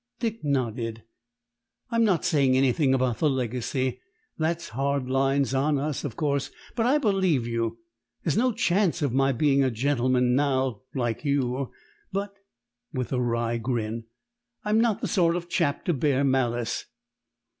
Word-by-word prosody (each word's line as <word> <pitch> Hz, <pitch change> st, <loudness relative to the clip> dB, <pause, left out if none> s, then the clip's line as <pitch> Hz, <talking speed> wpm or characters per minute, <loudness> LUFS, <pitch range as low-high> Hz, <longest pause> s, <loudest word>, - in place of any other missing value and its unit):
Dick 230 Hz, -1 st, -3 dB
nodded. 115 Hz, -5 st, -1 dB, 0.9 s
"I'm 230 Hz, 0 st, +3 dB
not 190 Hz, -7 st, +2 dB
saying 135 Hz, -4 st, +3 dB
anything 135 Hz, +1 st, +3 dB
about 130 Hz, -3 st, 0 dB
the 155 Hz, -, +3 dB
legacy. 130 Hz, 0 st, -1 dB, 0.4 s
That's 165 Hz, +1 st, -1 dB
hard 135 Hz, +2 st, -1 dB
lines 135 Hz, 0 st, +1 dB
on 140 Hz, +2 st, +2 dB
us, 145 Hz, 0 st, -2 dB
of 135 Hz, -6 st, -4 dB
course; 140 Hz, -3 st, 0 dB, 0.3 s
but 230 Hz, -1 st, +1 dB
I 280 Hz, +4 st, +4 dB
believe 190 Hz, -, +2 dB
you. 115 Hz, -1 st, -2 dB, 0.5 s
There's 155 Hz, -, 0 dB
no 250 Hz, +2 st, +3 dB
chance 175 Hz, -4 st, +1 dB
of 140 Hz, -5 st, 0 dB
my 135 Hz, +1 st, +3 dB
being 140 Hz, +1 st, +3 dB
a 130 Hz, -, +2 dB
gentleman 125 Hz, 0 st, +1 dB
now, 130 Hz, -4 st, +1 dB
like 120 Hz, -1 st, -1 dB
you; 135 Hz, -2 st, 0 dB, 0.4 s
but" 200 Hz, +1 st, -3 dB, 0.6 s
with 130 Hz, -3 st, -3 dB
a 125 Hz, -, +1 dB
wry 115 Hz, -1 st, 0 dB
grin 115 Hz, -1 st, -2 dB, 0.6 s
"I'm 215 Hz, +1 st, +3 dB
not 225 Hz, -2 st, +1 dB
the 225 Hz, -, -1 dB
sort 170 Hz, -3 st, +2 dB
of 175 Hz, -1 st, -4 dB
chap 170 Hz, -5 st, 0 dB
to 175 Hz, -, +2 dB
bear 140 Hz, -1 st, +1 dB
malice." 120 Hz, -4 st, 0 dB
135 Hz, 155 wpm, -26 LUFS, 125-160 Hz, 0.9 s, I